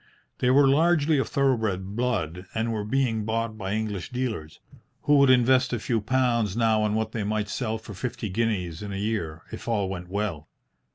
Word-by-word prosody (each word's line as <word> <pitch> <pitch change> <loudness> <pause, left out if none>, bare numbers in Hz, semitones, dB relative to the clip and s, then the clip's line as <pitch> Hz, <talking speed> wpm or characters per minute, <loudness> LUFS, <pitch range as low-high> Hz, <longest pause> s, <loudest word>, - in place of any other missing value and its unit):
They 125 - +2
were 135 +2 +6
largely 155 +1 +3
of - - -1
thoroughbred 110 -8 0
blood, 95 -8 -2
and 115 +1 0
were 105 -2 -2
being 115 -1 0
bought 115 +1 -2
by 95 -2 -4
English 105 -3 -3
dealers, 120 - -4 0.4
who 145 0 +4
would 140 -1 +5
invest 130 0 +4
a 120 - 0
few 115 +1 -1
pounds 120 -3 +1
now 110 -2 +3
on 105 0 +1
what 110 0 -1
they 110 -2 -3
might 105 0 -1
sell 110 -2 -2
for 110 -1 -10
fifty 115 +2 -4
guineas 95 -5 -1
in 105 -1 -5
a - - -4
year, 100 -7 -3
if - - -8
all 105 -5 0
went 90 -2 -6
well. 95 -6 -3
110 Hz, 190 wpm, -26 LUFS, 100-125 Hz, 0.4 s, were